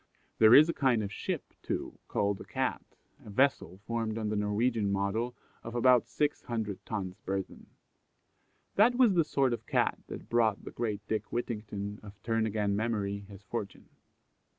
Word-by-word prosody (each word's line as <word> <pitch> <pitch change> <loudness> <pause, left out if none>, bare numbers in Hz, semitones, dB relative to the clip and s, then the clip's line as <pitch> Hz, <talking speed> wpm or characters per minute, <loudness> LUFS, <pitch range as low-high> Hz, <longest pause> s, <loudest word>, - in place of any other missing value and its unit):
There 110 +1 +8
is 155 +2 +9
a 170 - 0
kind 125 -6 +2
of 100 - -4
ship, - - -4
too, - - -4
called 100 -1 0
a - - -6
Cat, - - -2 0.4
a - - -11
vessel 105 - +1
formed 115 -1 -2
on 110 -1 -2
the 105 - -1
Norwegian 105 +1 +1
model, 100 +5 -1 0.3
of 115 +1 -7
about 125 0 +5
600 115 -8 -2
tons 95 -4 -4
burthen. 95 0 -4 1.1
That 230 +5 +6
was 245 -5 +5
the 170 -2 +4
sort 135 -4 +1
of 120 - -6
cat - - +1
that - - -8
brought 115 -3 +2
the - - -6
great 105 -3 -3
Dick 110 - -2
Whittington, 105 -3 -4
of 100 -1 -12
"turn 115 -1 +1
again" 105 -1 0
memory, 100 -2 -1
his 100 0 -12
fortune. 100 -1 -6
110 Hz, 165 wpm, -30 LUFS, 100-120 Hz, 1.1 s, is